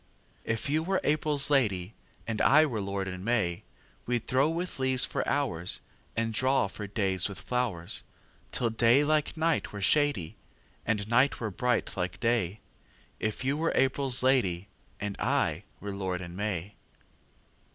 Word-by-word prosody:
If 115 -1 -2
you 150 +3 +1
were 190 +3 0
April's 150 -1 +2
lady, 105 -8 +1 0.3
And 115 -1 -2
I 155 +2 +6
were 115 -8 -2
lord 100 0 -3
in 90 -1 -6
May, 105 -6 0 0.5
We'd 120 -1 -1
throw 135 +4 +2
with 170 -1 -3
leaves 130 -1 +3
for - - -2
hoursAnd 115 - 0
draw 130 +3 +2
for 105 +1 -7
days 95 -2 0
with 95 -5 -7
flowers, 105 -4 -1 0.5
Till 115 -2 0
day 120 +5 +4
like 155 +1 0
night 165 +1 0
were 100 - -6
shadyAnd 105 - -1
night 125 +5 +3
were 110 -3 -3
bright 125 +5 -1
like 90 0 -3
day; 110 -5 0 0.6
If 110 +3 -3
you 140 +2 +1
were 165 +2 0
April's 135 -1 +1
lady, 100 -8 +2 0.3
And 100 -1 -3
I 80 +5 0
were 100 -1 -5
lord 95 -2 -3
in 90 -1 -8
May. 100 -1 -3
115 Hz, 150 wpm, -29 LUFS, 95-135 Hz, 0.6 s, I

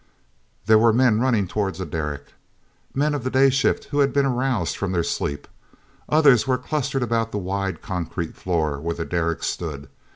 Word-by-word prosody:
There 110 +1 +6
were 115 +1 +5
men 115 -2 +3
running 115 -6 +1
toward 100 0 -2
the 95 - -5
derrick—men 80 - -5
of 145 -4 -3
the 130 - -1
day 135 +1 +4
shift 135 +2 +1
who 145 - 0
had 140 -1 +3
been 140 -1 +2
aroused 130 -2 0
from 95 -2 -3
their 85 -2 +1
sleep. 70 -2 -3 0.6
Others 140 -5 +5
were 130 -1 +2
clustered 140 -1 -2
about 115 -1 0
the - - -3
wide 95 -2 -3
concrete 85 -2 -4
floor 80 -6 -1
where 85 +3 -3
the 80 - -4
derrick 85 -2 -1
stood. 70 -5 -4
105 Hz, 175 wpm, -23 LUFS, 85-130 Hz, 0.6 s, There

